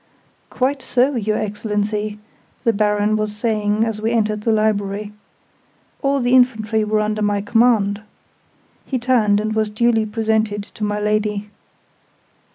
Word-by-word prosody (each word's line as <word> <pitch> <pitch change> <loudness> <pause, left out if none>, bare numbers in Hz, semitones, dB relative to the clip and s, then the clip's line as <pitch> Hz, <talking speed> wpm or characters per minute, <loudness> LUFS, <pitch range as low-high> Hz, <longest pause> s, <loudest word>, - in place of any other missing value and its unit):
"Quite 270 +2 -1
so, 255 +3 +1
your 215 -2 0
Excellency," 210 0 -2 0.5
the 230 -2 +3
Baron 210 0 +1
was 215 -1 -2
saying 210 -1 0
as 220 -2 -4
we 220 - 0
entered 215 -2 0
the 225 - +1
Library. 210 -1 0 0.9
"All 275 0 +1
the 245 0 +1
infantry 220 -3 +2
were 215 0 +1
under 215 0 -1
my 205 -1 +1
command." 210 -1 +2 0.8
He 265 - -2
turned, 235 -5 +2
and 215 +1 -2
was 215 -1 0
duly 225 0 +1
presented 220 -1 0
to 210 - -9
my 210 0 -1
Lady. 210 0 -1
215 Hz, 140 wpm, -20 LUFS, 210-225 Hz, 0.9 s, the